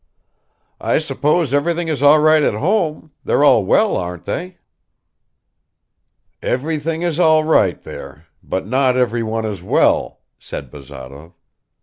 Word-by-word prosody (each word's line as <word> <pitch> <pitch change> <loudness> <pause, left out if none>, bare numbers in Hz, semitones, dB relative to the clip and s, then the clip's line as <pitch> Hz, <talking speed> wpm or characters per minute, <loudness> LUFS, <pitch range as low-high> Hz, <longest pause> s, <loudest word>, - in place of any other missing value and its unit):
"I - - 0
suppose 150 +1 0
everything 170 +4 0
is 150 -4 -2
all 145 +2 +6
right 155 0 +4
at 125 - +1
home; 160 - -1
they're - - +1
all - - +5
well, - - +2
aren't 90 -1 -5
they?" 180 +1 -5 1.8
"Everything 160 +4 -2
is 170 -2 -2
all 155 -2 +4
right 105 - +2
there, 75 +4 -10 0.2
but 95 - -4
not 130 +3 +1
everyone 115 -2 -1
is 100 -5 -5
well," 90 - +1 0.2
said 70 -4 -8
Bazarov. 70 +3 -12
140 Hz, 125 wpm, -18 LUFS, 95-160 Hz, 1.8 s, all